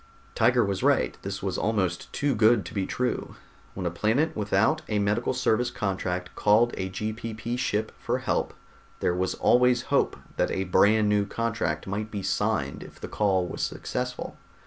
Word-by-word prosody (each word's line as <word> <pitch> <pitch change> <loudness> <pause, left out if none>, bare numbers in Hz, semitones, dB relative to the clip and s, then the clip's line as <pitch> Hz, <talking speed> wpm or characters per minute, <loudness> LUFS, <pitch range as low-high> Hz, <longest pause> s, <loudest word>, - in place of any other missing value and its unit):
Tiger 120 +1 +3
was 100 -1 -2
right; - - +2
this 95 0 -5
was 95 -2 -1
almost 95 -5 -1
too 145 -1 0
good 110 -3 +4
to 85 - -8
be 100 -3 -1
true. 125 0 -2 0.4
When 95 - -4
a 85 - 0
planet 115 - +1
without 105 +8 +2
a 105 - 0
medical 105 +3 +1
service 125 -1 +1
contract 95 -4 -3
called 110 +3 +3
a 95 0 -3
GPP 110 +4 -4
Ship 110 -4 -1
for - - -1
help, - - -1 0.4
there 90 - +1
was 90 +1 -1
always 125 0 +4
hope - - +2 0.2
that - - +2
a 95 - -1
brand 105 +3 +4
new 105 -1 +2
contract 115 -10 -2
might 105 +3 -3
be 105 -3 -5
signed - - -1
if - - -12
the - - -6
call 95 -3 +1
was - - -5
successful. 125 0 -4
105 Hz, 170 wpm, -27 LUFS, 95-120 Hz, 0.4 s, good